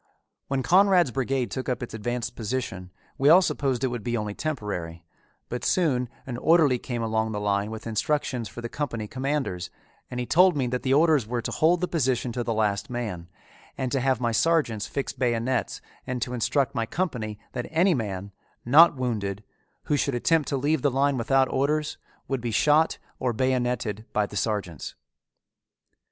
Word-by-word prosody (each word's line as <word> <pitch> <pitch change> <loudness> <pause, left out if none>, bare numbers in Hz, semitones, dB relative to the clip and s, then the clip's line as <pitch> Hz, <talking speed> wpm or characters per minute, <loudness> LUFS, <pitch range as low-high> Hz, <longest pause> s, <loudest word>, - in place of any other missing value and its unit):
When 135 -1 -1
Conrad's 185 -4 +5
brigade 130 -3 -1
took 130 0 -3
up 125 -1 -2
its 120 - -7
advanced 120 +2 -3
position 110 -6 -4 0.3
we 140 +2 +5
all 180 +4 +8
supposed 135 -6 -1
it 130 - +2
would 120 -3 -5
be 120 +1 -1
only 105 -1 -3
temporary, 100 - -4 0.4
but 120 0 -5
soon 130 -9 +1 0.2
an 125 -2 -5
orderly 150 -3 +4
came 120 -2 -4
along 110 0 0
the 105 - -2
line 100 0 0
with 110 0 -7
instructions 120 0 -1
for 120 - -8
the 120 - -4
company 120 -5 -4
commanders 130 -8 -2 0.4
and 125 - -4
he 125 - -2
told 180 +3 +5
me 135 - +1
that 125 +1 -2
the 130 - -1
orders 155 -6 +4
were 120 0 -2
to - - -3
hold 170 +2 +3
the 180 - +1
position 130 -7 0
to 120 +1 -2
the 115 - -2
last 105 -2 0
man, 105 -9 -4 0.5
and 130 -2 -2
to 135 - +1
have 130 -1 +1
my 120 -2 0
sergeants 120 -5 +1
fix 140 - -3
bayonets 125 0 -1 0.3
and 130 -1 -2
to 125 - -5
instruct 135 +3 +1
my 115 -4 -1
company 120 - -3
that 125 - -4
any 170 +4 +3
man, 100 - -3 0.3
not 150 +7 +7
wounded, 105 -6 -2 0.4
who 150 - 0
should 140 -2 0
attempt 160 +5 +2
to 140 - 0
leave 145 +2 +1
the 145 - +3
line 140 +2 +2
without 130 +2 +2
orders, 150 +3 0 0.3
would 135 -3 -2
be 120 - -2
shot 150 +8 +3 0.2
or 125 -2 0
bayonetted 120 -3 -1
by 105 - +2
the 100 - -10
sergeants. 95 -5 -3
125 Hz, 185 wpm, -26 LUFS, 110-140 Hz, 0.5 s, all